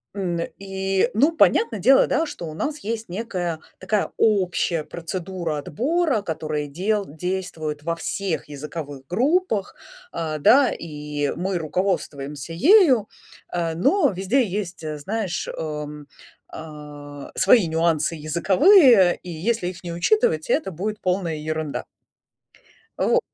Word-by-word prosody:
н 175 -4 -2 0.2
и 195 +2 -1
ну, 280 +10 +4
понятно 440 - +3
дело, 265 +8 +5
да, 315 +4 +1
что 175 - -7
у 155 - -7
нас 295 - -3
есть 225 -2 -4
некая 180 -5 -3 0.2
такая 200 +2 -1
общая 185 -6 +1
процедура 170 -1 -4
отбора, 270 - 0
которая 155 -3 -3
дел 200 +7 -1
действует 160 -2 -4
во 165 +1 -1
всех 175 -2 -3
языковых 145 -1 -7
группах, 240 - 0 0.4
а, 155 -2 -3
да, 260 - +5
и 150 -2 -4
мы 185 +1 -1
руководствуемся 155 -4 -3
ею, 275 - +5 0.5
э, 170 -2 -1
но 360 - +3
везде 195 +8 +1
есть, 190 -2 -4 0.2
знаешь, 195 +2 -3
эм, 150 -2 -6 0.4
а, 145 -2 -9
свои 195 0 +5
нюансы 165 0 +1
языковые, 190 - +5
и 180 - -9
если 180 +4 -1
их 180 0 -7
не 170 -1 -5
учитывать, 435 - +1
это 315 - +1
будет 210 +6 -4
полная 180 -3 -1
ерунда. 155 -1 -4 1.1
Во - - +3
180 Hz, 125 wpm, -23 LUFS, 155-215 Hz, 1.1 s, дело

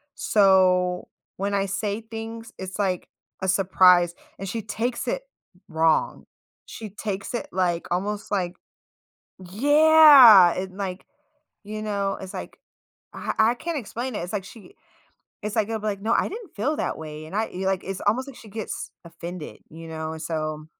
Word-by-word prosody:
so 185 -3 +3 0.3
when 200 +1 -2
I 200 0 +1
say 205 +2 -2
things 225 0 -8
it's 190 0 -7
like 185 -3 -1 0.3
a 190 - -2
surprise 180 -2 +4 0.2
and 195 - -5
she 225 +3 -3
takes 235 +3 -3
it - - -1 0.5
wrong. 160 -1 +1 0.4
She 220 -2 -8
takes 200 +1 -5
it, 235 - -4
like, 175 -2 0
almost 205 +4 -2
like 185 -3 -1 1.0
Yeah, 285 - +8
and, 185 0 -5
like, 190 -2 -4 0.6
you 215 +1 -6
know, 200 -2 -1
it's 190 -1 -8
like - - -7 0.6
I - - -4
I 220 +2 +5
can't 330 +3 -3
explain 245 +2 -5
it. - - -2
It's 175 - -7
like 205 -2 -2
she 225 - -14 0.7
it's 210 0 -4
like, 220 -3 +1
it'll 225 -1 -2
be 215 - -4
like, 200 -2 -3
"No 220 +2 -1
I - - +2
didn't 435 -4 -9
feel 270 +9 0
that - - -2
way," 155 -1 -8
and 160 - -12
I 220 +1 +1
y 185 - -5
like 190 -1 0
it's 195 0 -5
almost 255 +6 +1
like 275 - -10
she 220 - -13
gets 220 +1 -6
offended, 170 0 -8
you 165 +1 -10
know, 160 -1 -5
and 160 - -8
so 155 -1 -3
200 Hz, 175 wpm, -24 LUFS, 180-225 Hz, 1.0 s, Yeah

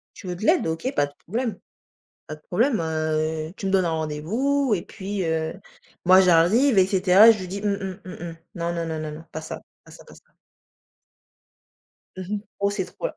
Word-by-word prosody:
Tu 195 - -11
veux 180 - -3
de 215 - -4
l'aide? 345 +1 +3
OK, 165 - -2
pas 145 - +2
de 145 - -14
problème. 230 +5 -3 0.7
Pas 155 - -7
de 150 - -23
problème, 230 +5 +1
heu, 155 0 -1
tu 195 - -5
me 190 - 0
donnes 190 -2 +3
un 165 - 0
rendez-vous 210 - -1
et 175 - -2
puis, 195 -1 -5
heu, 160 -1 -1 0.5
moi 185 +1 +8
j'arrive 190 +8 +4
et 185 - +6
cetera 190 +3 +6
et - - +10
je 190 - -6
dis: 190 +2 -5
«Mmh 205 - +1
mh, 190 -2 -6
mmh 185 - -8 0.2
mh, 165 - -11 0.2
non, 170 -1 -2
non, 170 -1 -3
non, 160 -1 -3
non, 155 0 -4
non, 160 +2 -10
pas 160 - -5
ça, 160 - -7 0.2
pas - - -17
ça, - - -14
pas - - -15
ça». - - -17 2.0
Mmh 185 +2 -4
mh. - - -3 0.2
Oh 200 0 +2
c'est 200 -2 -2
trop - - -5
là. - - -8
185 Hz, 220 wpm, -24 LUFS, 160-205 Hz, 2.0 s, et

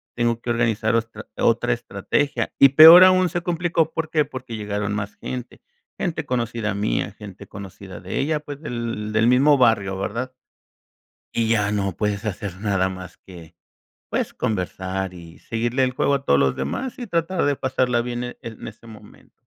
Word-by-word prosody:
tengo 120 -1 0
que 120 - -6
organizar 115 -2 +1
otra 115 0 -3
otra - - +2
estrategia", 145 - -2
y 140 - +8
peor 160 +6 +10
aún 185 -1 +4
se 175 +2 -3
complicó, 170 -2 0
¿por 160 -1 -3
qué? 155 -2 +2
Porque 130 -3 -8
llegaron 105 -1 -3
más 100 0 -4
gente. 125 -2 -7 0.4
Gente 160 -3 -3
conocida 115 -3 -2
mía, 100 -1 -1
gente 100 -1 -11
conocida 95 -2 -10
de 90 - -4
ella, 150 +2 0
pues, 145 -1 -9
del 115 -6 -4
del 110 +1 +3
mismo 140 +4 +5
barrio, 100 -6 +2
¿verdad? 120 +6 -3 1.1
Y 115 -1 +1
ya 105 -3 +2
no 100 -2 -1
puedes 105 -1 -1
hacer 100 -2 -5
nada 95 -3 +1
más 95 -1 -8
que, 85 -3 -14 0.5
pues, - - -2
conversar 95 -2 -3
y 85 -2 -12
seguirle 120 +3 -1
el 130 - +1
juego 135 +2 0
a 140 -1 -1
todos 70 - +3
los 65 -1 +2
demás, 75 - -4
y 245 -3 -6
tratar 170 0 -1
de 145 -1 +1
pasarla 130 -2 0
bien 120 0 -4
en 125 - -7
en 115 -2 -8
ese 115 +1 -17
momento. 110 -1 -16
115 Hz, 175 wpm, -22 LUFS, 100-135 Hz, 1.1 s, peor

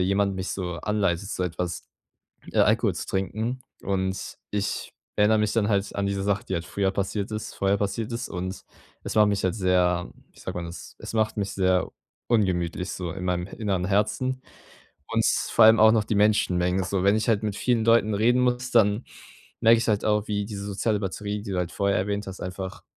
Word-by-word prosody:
jemand 100 +1 +1
mich 95 0 -3
so 90 -2 -3
anleitet, 100 -1 -1
so 90 - -2
etwas 90 0 -4 0.7
äh, - - +2
Alkohol - - +3
zu - - -4
trinken. 110 +6 -2 0.2
Und 95 -1 -2
ich 105 -1 -2 0.2
erinnere 105 +1 +4
mich 105 -1 +1
dann 110 -3 +2
halt 100 -1 0
an 100 - 0
diese 100 0 -1
Sache, 100 0 0
die - - -4
halt 85 - -2
früher 95 +1 0
passiert 100 +2 -2
ist 110 0 -5
vorher 100 +1 +1
passiert 105 +3 -2
ist. 115 - -4
Und 95 +1 -5 0.4
es - - -5
macht 105 -1 +6
mich 100 -1 -1
halt 95 -1 +1
sehr, 90 -3 +2 0.2
wie - - -20
sagt - - -6
man 90 -1 -3
das 85 +1 -9
es - - -7
macht 110 -1 +1
mich 100 -1 -1
sehr 95 -2 +2 0.4
ungemütlich, 90 -4 +1
so 90 -2 -4
in 90 0 -6
meinem 90 -1 -1
inneren 95 -4 -2
Herzen, 110 +6 0 0.7
und 115 0 +1 0.3
vor 115 - +7
allem 110 0 +7
auch 110 0 +8
noch 110 -1 +3
die 110 - -1
Menschenmengen. 95 -3 +2
So, 95 0 -1
wenn 100 +2 +4
ich 110 - -2
halt 110 -2 +2
mit 105 -2 -2
vielen 120 -1 +1
Leuten 115 -2 +4
reden 120 +5 +3
muss, 125 0 0
dann 105 0 +3 0.6
merke 115 +1 +6
ich 115 - -2
halt 105 -2 +1
auch, 105 0 +1
wie 105 -1 -1
diese 100 -1 -6
soziale 105 +1 0
Batterie, 105 +1 -3
die 105 - -7
du 95 - -2
halt 90 -1 -1
vorher 100 -1 +1
erwähnt 100 +2 -2
hast, 95 0 -7
einfach 95 +1 -6
100 Hz, 205 wpm, -25 LUFS, 95-110 Hz, 0.7 s, auch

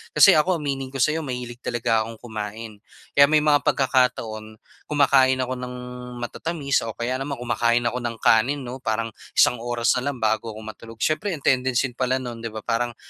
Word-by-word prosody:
Kasi 150 - +8
ako, 175 +4 +3
aminin 135 -3 -3
ko 135 - -15
sa'yo, 155 +5 +2
mahilig 125 -4 -6
talaga 115 -2 0
akong 115 +1 -6
kumain. 110 -1 -7 0.3
Kaya 140 0 +7
may 155 -1 +4
mga 150 -1 +4
pagkakataon, 115 -5 +1 0.3
kumakain 135 -3 +4
ako 130 0 -4
ng 125 0 -6 0.5
matatamis 145 +2 -1
o 110 - -6
kaya 125 +2 -2
naman 140 +1 -3
kumakain 120 0 +1
ako 120 +1 0
ng 120 -1 -3
kanin, 130 +6 +3
'no, 125 +2 -7
parang 115 -1 -2 0.3
isang 125 - +5
oras 120 0 +1
na 135 +3 -2
lang 140 - -5
bago 110 +1 +1
ako 110 - -9
matulog. 115 +1 -10
Siyempre, 165 +5 0
ang 145 - -12
tendency 130 0 +2
pala 130 0 +1
no'n, 120 -3 -6
'di 115 - -3
ba, 110 -1 -8
parang 120 0 -1
125 Hz, 190 wpm, -23 LUFS, 115-135 Hz, 0.5 s, Kasi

